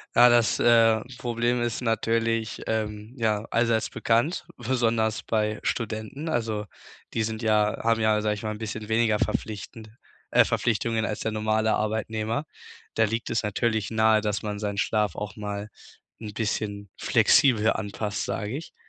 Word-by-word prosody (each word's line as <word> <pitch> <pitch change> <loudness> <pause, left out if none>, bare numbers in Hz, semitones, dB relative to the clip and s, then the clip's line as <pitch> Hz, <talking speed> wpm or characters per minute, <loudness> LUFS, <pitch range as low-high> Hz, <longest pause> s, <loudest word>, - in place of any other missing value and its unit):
Ja, 125 - +8
das, 120 -2 +3
äh, 115 -2 +5 0.2
Problem 120 0 0
ist 120 +1 -2
natürlich, 115 -1 0
ähm, 110 +1 -3
ja, 110 -1 0
allseits 115 -1 +1
bekannt, 120 +10 0
besonders 115 -3 0
bei 105 -1 0
Studenten, 115 +7 -3
also, 110 -5 -1 0.5
die 110 - 0
sind 110 +1 -3
ja 105 -1 +2
haben 115 0 +2
ja, 110 -1 +3
sage 105 0 +1
ich 105 - -9
mal, 110 - -2
'n - - -8
bisschen 110 0 -6
weniger 110 -1 +2
verpflichtend, 110 +1 -3 0.4
äh - - +6
Verpflichtungen 115 0 0
als 105 0 -3
der 110 - -1
normale 110 0 +1
Arbeitnehmer. 110 +4 -2 0.5
Da 110 - +4
liegt 115 +2 -3
es 115 - 0
natürlich 110 0 0
nahe, 110 -1 +4
dass 105 -1 -2
man 105 -1 -3
seinen 100 -1 -3
Schlaf 105 0 +1
auch 105 -1 -6
mal 105 0 -5 0.5
'n 105 -2 -7
bisschen 100 -2 -3
flexibel 115 -5 +4
anpasst, 105 0 -3
sage 105 +5 -3
ich. 165 - -9
110 Hz, 155 wpm, -26 LUFS, 105-115 Hz, 0.5 s, Ja